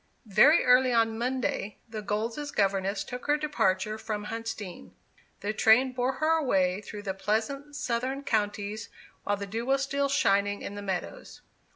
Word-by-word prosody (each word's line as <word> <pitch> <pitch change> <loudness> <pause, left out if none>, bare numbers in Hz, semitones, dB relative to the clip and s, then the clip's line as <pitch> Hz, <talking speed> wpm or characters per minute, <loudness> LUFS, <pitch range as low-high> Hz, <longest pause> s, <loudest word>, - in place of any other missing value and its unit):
Very 230 - +5
early 250 0 +5
on 225 -1 +2
Monday, 245 -4 -2
the 220 -2 -6
Golds' 225 +8 -3
governess 195 -3 0
took 250 +2 -7
her 295 0 +3
departure 215 -8 0
from 215 -1 -4
Huntsdean. 225 -4 -6 0.5
The 210 +1 -2
train 225 +5 +5
bore 250 +1 0
her 310 +4 +2
away 190 -9 +1
through 205 0 -8
the 195 -2 -2
pleasant 225 +9 -2
southern 260 +1 -2
counties 215 -2 -2 0.4
while 205 0 +1
the 200 - -5
dew 220 +4 -4
was 275 0 +2
still 280 +1 0
shining 205 -6 +1
on - - -5
the 205 - -6
meadows. 190 -3 -5
220 Hz, 160 wpm, -28 LUFS, 205-260 Hz, 0.5 s, Very